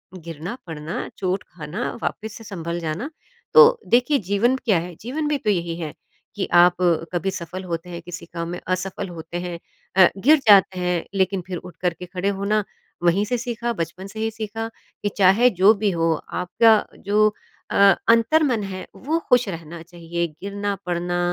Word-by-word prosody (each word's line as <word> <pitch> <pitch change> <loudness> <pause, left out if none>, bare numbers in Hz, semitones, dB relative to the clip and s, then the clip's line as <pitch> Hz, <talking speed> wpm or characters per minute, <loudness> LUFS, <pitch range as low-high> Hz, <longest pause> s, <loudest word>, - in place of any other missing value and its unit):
गिरना-पड़ना, 165 - -6
चोट 185 0 -1
खाना 160 -1 -5
वापस 220 -1 -3
से 225 - -12
सँभल 170 -4 -5
जाना। 170 - -3 0.4
तो 475 +1 +8
देखिए, 250 +5 +3
जीवन 205 +6 +1
क्या 210 -7 +4
है? 175 0 -7
जीवन 295 +7 -3
भी 295 -1 +1
तो 215 - -2
यही 170 -4 0
है, 155 -3 -5 0.4
कि 200 - -2
आप 175 0 +6 0.4
कभी 180 +2 0
सफ़ल 185 +1 -6
होते 170 -1 -5
हैं, 170 -1 -6
किसी 175 +1 -8
काम 170 -1 -3
में 175 - -5
असफ़ल 185 +1 -2
होते 170 0 -7
हैं 175 -1 -5 0.4
अ, 185 - +9
गिर 295 +11 +5
जाते 195 -2 +6
हैं 180 -1 0
लेकिन 190 0 +1
फ़िर 180 -2 -4
उठ 180 -2 -11
कर 180 -2 +1
के 180 - -6
खड़े 185 +2 -2
होना 210 +2 +1 0.4
वहीं 175 +4 +3
से 245 +3 -1
सीखा, 235 -1 -3
बचपन 180 +1 -5
से 220 +2 -9
ही 220 - 0
सीखा, 225 +1 -5 0.4
कि 205 - +1
चाहे 205 +6 +6
जो 195 +2 +5
भी 205 0 0
हो 165 -1 +1 0.3
आपका 210 +5 +4 0.2
जो 210 +1 +4 0.4
अ, - - -2 0.3
अंतर्मन 230 +1 +4
है, 190 -1 -6
वो 320 +5 -1
ख़ुश 245 -3 +5
रहना 165 -1 -7
चाहिए, 170 0 -4
गिरना, 200 0 -3
पड़ना 175 0 -1
190 Hz, 175 wpm, -22 LUFS, 175-220 Hz, 0.4 s, अ